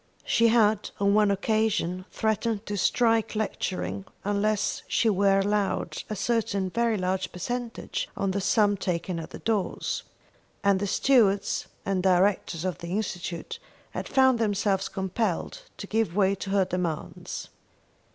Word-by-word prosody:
She 230 0 +4
had 220 -2 +3
on 200 0 +3
one 210 -1 +4
occasion 200 -3 0
threatened 220 0 -1
to 205 - -3
strike 225 +3 +2
lecturing 100 - -2 0.2
unless 205 +1 0
she 225 - +2
were 195 0 +3
allowed 205 0 0
a 215 - -2
certain 210 -4 0
very 235 +1 +1
large 185 0 -1
percentage 240 +6 -4
on 195 -1 0
the 200 +1 -1
sum 205 0 +3
taken 175 -1 -2
at 160 - -7
the - - -8
doors, 215 -4 -1 0.6
and 200 -1 +4
the 205 - -1
stewards 205 -4 +2 0.2
and 190 -1 0
directors 185 -2 +2
of 180 -5 -2
the 170 - -7
Institute 190 - -4 0.3
had - - -5
found 260 -3 +4
themselves 200 -3 +1
compelled 190 - -2 0.2
to - - -6
give 215 -6 0
way 195 -1 +3
to 195 0 -5
her 195 -1 +3
demands. 175 -4 -4
200 Hz, 140 wpm, -27 LUFS, 185-220 Hz, 0.6 s, She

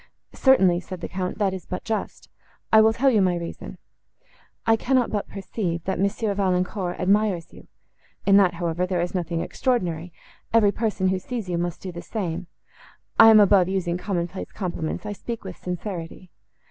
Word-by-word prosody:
—"Certainly," 190 -10 +4
said 185 0 -8
the - - -5
Count, 185 0 -4
"that 200 -3 +1
is 185 -4 -7
but 180 - -5
just. 225 -2 -4 0.5
I 220 - +9
will 220 0 +5
tell 265 +4 +2
you 215 -4 +3
my 180 -2 +2
reason. 170 -1 -7 0.9
I 225 - +5
cannot 250 +2 +1
but 205 -2 -2
perceive, 185 -4 -4
that 190 - -2
Monsieur 200 +2 0
Valancourt 185 -1 -1
admires 195 -2 +1
you; - - -15 0.6
in 195 - +5
that, 185 -4 +4
however, 170 +1 -1
there 180 -1 -1
is 175 +2 -3
nothing 170 -2 -2
extraordinary; 180 - -1 0.4
every 210 -3 +5
person, 205 -4 0
who 190 0 0
sees 225 -1 -5
you, 170 -1 -1
must 175 -1 -3
do 185 - -5
the 170 0 -7
same. 180 -2 -4 0.7
I 225 - +10
am 220 -1 +8
above 195 -3 +5
using 180 -2 -1
common 180 -3 -2
place 185 +2 -8
compliments; 175 -2 -4
I 210 - -3
speak 230 +3 -6
with 185 -2 -8
sincerity. 180 -1 -6
185 Hz, 180 wpm, -24 LUFS, 175-210 Hz, 0.9 s, I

